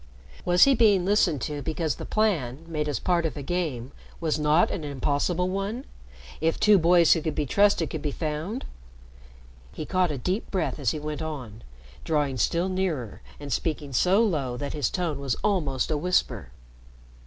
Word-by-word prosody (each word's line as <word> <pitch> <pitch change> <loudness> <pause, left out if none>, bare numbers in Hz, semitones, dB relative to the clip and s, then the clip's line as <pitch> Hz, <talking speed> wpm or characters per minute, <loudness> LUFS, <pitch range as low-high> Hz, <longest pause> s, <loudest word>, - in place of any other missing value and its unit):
Was 175 0 +5
he 275 - +6
being 210 -7 +4
listened 185 - +2
to 145 +2 -3
because 160 -2 -2
the - - -7
plan, 165 - 0
made 155 -2 -2
as 145 - -1
part 175 +4 +1
of 160 -2 -3
a 145 - -5
game, 140 -7 -3 0.3
was 160 -2 -1
not 150 +3 +3
an 165 - -4
impossible 145 +5 -1
one 200 +7 -3 0.6
if 165 0 +1
two 210 -2 +6
boys 170 0 +5
who 165 - -1
could 155 -2 -3
be 150 - 0
trusted 200 +2 +2
could 160 - -4
be 150 - -1
found? 160 - -4 1.1
He 155 - -6
caught 185 0 +1
a 145 - -3
deep 185 - -2
breath 185 -5 -2
as 135 -6 +1
he - - -2
went 150 +1 -5
on, 130 -9 -6 0.4
drawing 145 -4 0
still 170 +9 +1
nearer 180 - -2 0.2
and 145 -3 -4
speaking 150 -2 -2
so 190 - +4
low 140 - -1
that 140 +1 -4
his 145 -6 0
tone 170 -6 -2
was 135 -4 -1
almost 155 - 0
a 150 - +1
whisper. 180 +4 0
160 Hz, 180 wpm, -26 LUFS, 145-180 Hz, 1.1 s, he